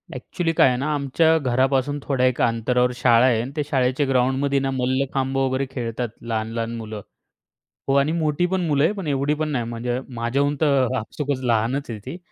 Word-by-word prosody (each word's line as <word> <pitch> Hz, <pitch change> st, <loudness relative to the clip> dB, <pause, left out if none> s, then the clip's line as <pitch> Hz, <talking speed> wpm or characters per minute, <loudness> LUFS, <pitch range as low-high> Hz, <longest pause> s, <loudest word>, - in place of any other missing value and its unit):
Actually 170 Hz, -3 st, -2 dB
काय -, -, +5 dB
आहे 125 Hz, -1 st, +1 dB
ना? 135 Hz, -, -2 dB
आमच्या 160 Hz, +4 st, +2 dB
घरापासून 135 Hz, +1 st, +1 dB
थोड्या 130 Hz, -3 st, +1 dB
एका 125 Hz, -1 st, +2 dB
अंतरावर 125 Hz, +2 st, +1 dB
शाळा 120 Hz, -1 st, +4 dB
आहे, 120 Hz, -4 st, +3 dB
आणि 125 Hz, +3 st, -6 dB
ते 150 Hz, -, 0 dB
शाळेच्या 135 Hz, -1 st, 0 dB
ग्राउंडमध्ये 135 Hz, +2 st, +1 dB
ना 135 Hz, 0 st, -1 dB
मल्लखांब 130 Hz, +1 st, -1 dB
वगैरे 135 Hz, 0 st, 0 dB
खेळतात, 120 Hz, -1 st, -3 dB
लहान-लहान 115 Hz, 0 st, -3 dB
मुलं. 110 Hz, -2 st, -6 dB, 0.9 s
हो 135 Hz, -, +2 dB
आणि 140 Hz, +3 st, +1 dB
मोठी 155 Hz, +1 st, +1 dB
पण 190 Hz, -1 st, +1 dB
मुलं 145 Hz, -2 st, +2 dB
आहेत, 165 Hz, -, +3 dB
पण 195 Hz, -5 st, -5 dB
एवढी 140 Hz, +1 st, +1 dB
पण 155 Hz, 0 st, -2 dB
नाही. 125 Hz, -5 st, -1 dB
म्हणजे 120 Hz, +2 st, -3 dB, 0.2 s
माझ्याहून 140 Hz, +5 st, 0 dB
तर 135 Hz, -4 st, +2 dB
आपसुकच 140 Hz, +4 st, -3 dB
लहानच 120 Hz, +4 st, 0 dB
आहे 110 Hz, -3 st, -5 dB
ती. 175 Hz, -, -6 dB
130 Hz, 185 wpm, -22 LUFS, 120-145 Hz, 0.9 s, काय